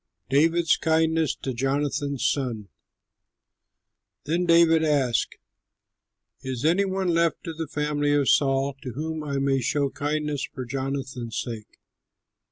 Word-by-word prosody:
DAVID'S 165 +4 +3
KINDNESS 160 -1 +2
TO 130 - -5
JONATHAN'S 140 +2 -1
SON 120 -9 -1 1.5
Then 170 +4 -1
David 165 -1 +5
asked, 140 -6 +1 1.0
"Is 130 0 -4
any 180 +5 +3
one 190 -1 -1
left 170 0 +1
of 165 -2 -6
the 160 - -2
family 150 0 -1
of 140 -2 +2
Saul 135 0 +2
to 130 -5 -6
whom 155 +3 -4
I 140 -2 -3
may 135 -1 +1
show 140 +2 0
kindness 150 -1 -2
for 130 -3 -6
Jonathan's 130 -2 -4
sake?" 115 -3 -7
145 Hz, 125 wpm, -25 LUFS, 135-160 Hz, 1.5 s, David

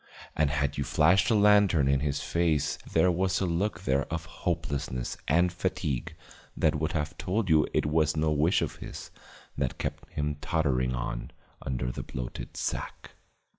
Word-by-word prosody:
And 75 -2 +2
had 70 -1 -1
you - - +1
flashed 90 +5 +3
a 115 - +4
lantern 100 -8 +5
in 70 0 +3
his 70 0 -1
face 85 -4 0
there 90 +3 +4
was 95 +2 +1
a 95 - 0
look 90 +5 -1
there 70 +1 0
of 80 0 -3
hopelessness 75 -8 -3
and 85 +4 +3
fatigue 70 -6 -2 0.4
that - - +3
would 75 +1 -1
have 75 +1 -2
told 95 +1 -1
you 80 -1 +5
it - - +1
was 75 0 +2
no 80 0 +2
wish 75 +4 +3
of - - -4
his - - -8 0.5
that 65 -4 -1
kept - - -5
him 75 0 -2
tottering 65 -6 +1
on - - -4 0.3
under 60 -2 -2
that - - -7
bloated 60 -1 -6
sack. - - -4
75 Hz, 170 wpm, -28 LUFS, 70-85 Hz, 0.5 s, lantern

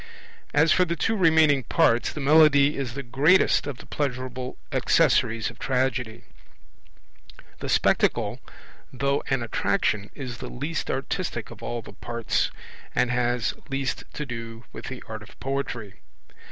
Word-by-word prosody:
As 155 +2 +4
for 185 - +5
the 170 -1 -1
two 225 +6 0
remaining 160 -6 +4
parts, 115 0 +2
the - - -7
Melody 145 0 +5
is 130 -4 -4
the 140 - -4
greatest 145 +8 +3
of 140 -4 -4
the - - -12
pleasurable 130 -2 -3
accessories 115 -1 +2
of - - -19
Tragedy. 125 -3 -1 1.4
The - - -5
Spectacle, - - +2 0.5
though 140 +2 0
an 135 -3 +1
attraction, 105 -2 0
is 125 -4 -6
the - - -6
least 145 +5 -4
artistic - - -3
of - - -11
all 120 -1 -4
the - - -11
parts, 115 -1 -1 0.5
and 125 0 +2
has 120 -1 0 0.2
least 135 -1 -2
to 150 - -4
do 115 -2 -7
with - - -8
the 130 -2 -7
art 110 -1 -6
of 105 - -15
poetry. 125 -7 -4
130 Hz, 145 wpm, -25 LUFS, 120-145 Hz, 1.4 s, for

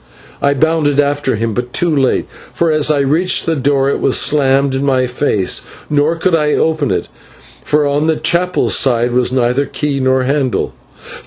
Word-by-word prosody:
I 140 0 +2
bounded 150 -1 +1
after 145 -2 0
him, 115 +1 -2
but 125 +3 -4
too 170 -3 0
late, 135 -3 +1 0.3
for 170 -1 0
as 155 -1 +1
I 145 -2 +2
reached 160 +7 +1
the 165 - 0
door 135 -1 +1
it - - -2
was 135 - +1
slammed 140 -1 +2
in 135 +1 -2
my 130 -2 +1
face, 125 -7 0 0.3
nor 150 +3 +1
could 170 +2 -1
I 150 -2 +2
open 160 -3 0
it, - - -2 0.6
for 150 0 +1
on 145 +2 0
the 160 - +2
chapel 175 +4 0
side 120 -2 +2
were 125 0 +2
neither 125 +2 0
key 145 -2 -3
nor 130 0 +1
handle. 135 -1 -1
140 Hz, 180 wpm, -14 LUFS, 130-155 Hz, 0.6 s, I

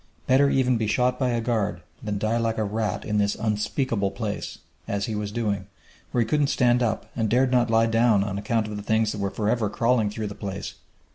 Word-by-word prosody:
Better 135 +2 +4
even 130 -3 +2
be 110 -1 -1
shot 125 +3 +1
by 130 -2 +1
a 120 -1 0
guard 105 -6 -1 0.2
than 105 -1 -3
die 110 +3 0
like 115 -1 0
a 110 - +1
rat 105 +1 -2
in 105 -1 0
this 100 0 +1
unspeakable 105 0 -1
place, 100 +1 -4 0.3
as 100 0 -1
he 110 - -4
was 105 -1 -3
doing, 105 -4 -2 0.4
where 120 - +1
he - - -6
couldn't 150 +2 +2
stand 125 -3 +3
up 115 -3 0
and 110 -2 0
dared 125 +3 +3
not 120 -2 +3
lie 115 0 +4
down 115 -2 +3
on 100 -1 -3
account 110 +2 0
of 105 -1 -5
the - - -5
things 110 +1 +1
that 105 - -5
were 100 - 0
forever 110 +1 0
crawling 115 -1 +2
through 105 +1 -4
the 105 - -4
place! 100 -1 -5
110 Hz, 225 wpm, -25 LUFS, 105-120 Hz, 0.4 s, Better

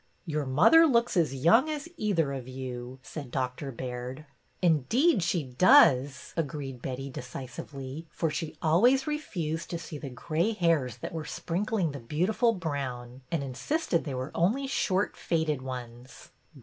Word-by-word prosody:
Your 150 -4 -2
mother 250 - +6
looks 235 -4 +2
as 160 -7 +2
young 225 - +4
as 300 0 -4
either 170 - 0
of 130 -2 -6
you," 130 -1 -6
said 145 -3 -7
Dr. 130 +2 -3
Baird. 125 +3 -6 0.2
" - - -40
Indeed 190 - +3
she 170 -1 0
does," 130 -1 +4
agreed 140 -5 -4
Betty, 135 +2 -5
decisively, 130 +4 -7
for 155 +1 -1
she 155 +1 -4
always 240 +12 +4
refused 175 - -3
to 170 - -2
see 160 -2 -8
the 140 - -6
gray 165 - -1
hairs 160 - +1
that 120 - -6
were 160 -1 -3
sprinkling 175 +2 -1
the 140 - -7
beautiful 180 - +1
brown, 135 - -4
and 165 -5 0
insisted 170 - -1
they 140 -4 -4
were 130 +2 -4
only 220 +12 +1
short 205 -7 0
faded 160 -5 -1
ones. 125 -1 -8
150 Hz, 150 wpm, -29 LUFS, 130-180 Hz, 0.2 s, mother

